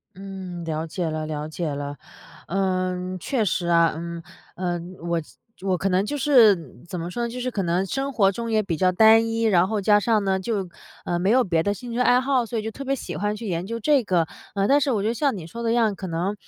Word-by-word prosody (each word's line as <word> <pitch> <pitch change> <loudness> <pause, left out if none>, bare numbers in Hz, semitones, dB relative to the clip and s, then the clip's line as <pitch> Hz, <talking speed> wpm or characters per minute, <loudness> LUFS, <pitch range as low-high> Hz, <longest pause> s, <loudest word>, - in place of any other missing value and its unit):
嗯， 190 -3 -7
了 160 0 -3
解 165 +1 -3
了 155 0 -3
了 155 0 -4
解 160 0 -3
了。 145 0 -5 0.5
呃， 185 0 -1
确 240 - 0
实 175 -1 -1
啊， 170 -1 +4
嗯， 170 0 -6 0.3
呃， 175 -1 -2 0.3
我 170 -1 0 0.4
我 185 -2 0
可 195 - 0
能 185 +1 +2
就 290 +7 -3
是 210 - +4
怎 180 - -5
么 170 +2 -4
说 240 +5 -3
呢， - - -2
就 250 - -6
是 255 - -2
可 205 -5 -2
能 175 +2 0
生 275 +5 -2
活 200 -4 +3
中 230 +3 -4
也 220 -1 +3
比 175 -5 -2
较 185 +4 +3
单 220 +4 +6
一， 225 0 -1
然 185 -4 +4
后 215 -2 -1
加 205 +1 +4
上 215 -1 +2
呢， 190 -1 +1
就 195 -2 -2 0.4
呃， 175 0 -1
没 190 +4 +1
有 255 +1 +4
别 165 -4 +1
的 205 - 0
兴 245 +1 -8
趣 240 - -3
爱 250 0 +5
好， 260 -2 +1
所 230 0 -4
以 - - -2
就 220 0 -4
特 275 - -7
别 275 +1 0
喜 - - -6
欢 210 +1 -1
去 225 0 -7
研 175 +1 -2
究 230 +1 -4
这 285 +3 +3
个。 180 -6 +1 0.3
呃， 200 0 +1
但 285 +1 +4
是 280 - +1
我 220 -5 +1
觉 210 - -1
得 230 - 0
像 275 -3 0
你 165 -3 -7
说 235 +7 -7
的 230 - 0
一 - - +2
样， 225 -4 +2
可 190 -1 -6
能， 175 +5 -1
195 Hz, 275 characters per minute, -24 LUFS, 175-230 Hz, 0.5 s, 单